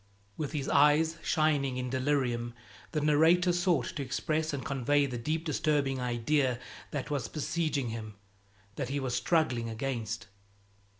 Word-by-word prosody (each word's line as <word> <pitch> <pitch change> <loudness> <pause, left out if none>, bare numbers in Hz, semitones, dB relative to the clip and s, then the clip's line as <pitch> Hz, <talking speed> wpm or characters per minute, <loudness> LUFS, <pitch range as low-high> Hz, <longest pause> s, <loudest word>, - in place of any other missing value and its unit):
With 150 -1 -4
his 140 -3 -2
eyes 155 +3 +4
shining 145 -5 +1
in 125 -1 -3
delirium, 130 -3 0 0.4
the 155 - 0
narrator 165 +4 +4
sought 175 -7 +2
to - - -2
express 155 +4 -1
and 140 -2 -4
convey 140 0 +2
the 125 -3 -4
deep 155 +7 -2
disturbing 145 -3 +1
idea 125 +2 +1 0.3
that 145 0 -4
was 135 -6 -1
besieging 155 -3 -1
him, 110 -2 -6 0.6
that 125 - -2
he 140 +1 -1
was 130 -2 -2
struggling 125 -5 +1
against. 115 -1 -3
140 Hz, 140 wpm, -30 LUFS, 125-155 Hz, 0.6 s, eyes